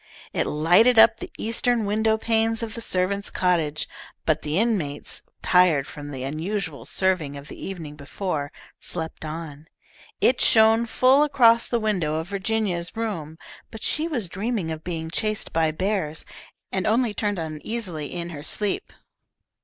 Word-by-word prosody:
It - - 0
lighted 175 +11 +4
up 225 0 +8
the - - -6
eastern 230 0 0
window 220 +2 +2
panes 225 0 +1
of 225 -1 -4
the 230 - -6
servants' 200 0 0
cottage, 165 -5 0 0.4
but 155 -1 +2
the 150 +2 -2
inmates, 190 -11 0 0.2
tired 180 -7 +4
from 145 0 -8
the 135 -3 -5
unusual 160 +3 -3
serving 180 -7 0
of 140 +1 -11
the - - -9
evening 160 -6 -6
before, 145 0 -3 0.3
slept 160 -2 -4
on. 155 -1 -7 0.5
It 250 - +3
shone 225 +1 +5
full 255 +5 +4
across 245 -6 +5
the 235 - 0
window 185 -9 0
of 160 +3 -3
Virginia's 200 -2 -1
room, 165 -9 -3 0.3
but 225 - -10
she 310 +2 0
was 245 - -1
dreaming 195 -1 -2
of 160 0 -6
being 160 -2 -4
chased 215 +2 -2
by 160 -1 +3
bears, 165 -2 -2 0.5
and 190 -1 -1
only 230 0 +2
turned 205 -1 -1
uneasily 160 0 -4
in 175 -1 -4
her 145 -3 -7
sleep. 200 +6 -2
185 Hz, 155 wpm, -24 LUFS, 160-220 Hz, 0.5 s, up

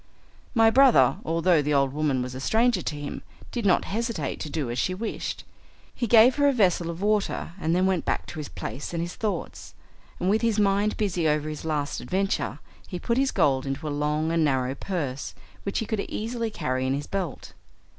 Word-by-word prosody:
My 225 -1 +6
brother, 265 +1 +6
although 165 0 +3
the 145 0 0
old 135 -1 +2
woman 145 -4 0
was 125 0 -6
a 130 - -6
stranger 220 - +2
to 150 - -3
him, 145 - -5 0.3
did 235 -4 -1
not 185 - +3
hesitate 230 +3 -2
to 155 - -5
do 145 -6 -2
as 120 - -2
she 185 - 0
wished. 220 +3 -4 0.5
He 240 - -2
gave 235 +4 +6
her 285 0 +4
a - - +5
vessel 180 -7 +2
of 170 +3 -5
water 210 -4 0
and 165 +2 +1
then 185 +1 +3
went 190 -3 +1
back - - -1
to - - -8
his 150 - -6
place 140 +5 -6
and 165 - -1
his 175 +1 -5
thoughts, 205 -6 -4 0.4
and 180 - -1
with 210 +3 +3
his 230 -2 +1
mind 205 +1 +2
busy 180 -6 0
over 150 0 +1
his 155 0 -6
last 150 -2 -2
adventure, 195 +1 -1 0.3
he 180 - -5
put 235 +7 0
his 270 0 +2
gold 135 - +2
into 135 +3 -3
a 145 - -2
long 150 +2 0
and 165 -1 +2
narrow 130 -3 +1
purse, 140 -5 -4 0.3
which 200 - -3
he 225 - -1
could 215 0 -2
easily 230 +3 -3
carry 130 -10 -2
in 135 - +1
his 145 +1 -4
belt. 185 -8 -4
175 Hz, 210 wpm, -26 LUFS, 150-215 Hz, 0.5 s, My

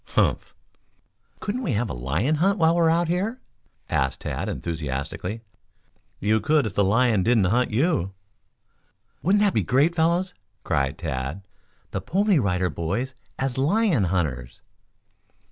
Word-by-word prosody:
"Humph!" - - +1 0.8
"Couldn't 220 +5 -3
we 220 - -1
have 110 +3 0
a - - -5
lion 75 - 0
hunt 195 +6 +2
while 165 -2 +4
we 170 - +2
are 165 - +4
out 170 +1 +2
here?" 200 +9 -1 0.5
asked 65 0 -1
Tad - - -3
enthusiastically. 80 +6 -4 0.8
"You 110 +2 +2
could 150 +3 +2
if 105 - -3
the 100 - +2
lion 110 +1 +3
didn't 115 +1 +3
hunt 120 +7 +2
you." 120 - 0 1.1
"Wouldn't 205 +4 +3
that 205 - +3
be 110 - +2
great, 135 - +2
fellows?" 170 +3 +1 0.3
cried 70 -1 0
Tad. 65 +9 -4 0.5
"The - - -3
Pony 195 -1 +2
Rider 90 -5 0
Boys 100 - -3 0.2
as 130 -1 -2
lion 165 - +2
hunters." 70 -9 -2
120 Hz, 145 wpm, -24 LUFS, -, 1.1 s, while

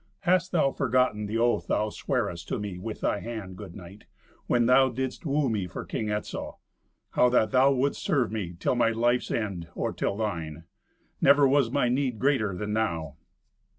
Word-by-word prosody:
Hast 185 +1 +2
thou 155 -6 +2
forgotten 125 -6 +1
the 110 +2 -2
oath 120 +1 +1
thou 105 - +1
swearest 105 -12 -2
to - - -2
me 100 -3 -5
with 110 +3 -6
thy 105 - 0
hand, 110 -5 -6
good 95 -3 -10
knight, 95 +2 -12 0.4
when 120 -1 +3
thou 130 +2 +5
didst 130 +5 -4
woo 145 0 +1
me 105 -6 -1
for 90 - -7
King 110 -2 -3
Etzel—how 105 +3 -3
that 110 -4 +2
thou 130 +2 +5
wouldst 135 +1 0
serve 125 -7 +1
me 95 -6 -4
till - - +1
my 120 -2 +3
life's 120 +2 +1
end, 100 -7 -3
or - - -2
till 100 - -2
thine? 85 -7 -4 0.6
Never 140 0 +6
was 135 -3 +3
my 130 0 +1
need 125 -1 0
greater 115 -7 +1
than 105 +2 -3
now." 85 -9 -2
115 Hz, 180 wpm, -27 LUFS, 105-130 Hz, 0.6 s, Never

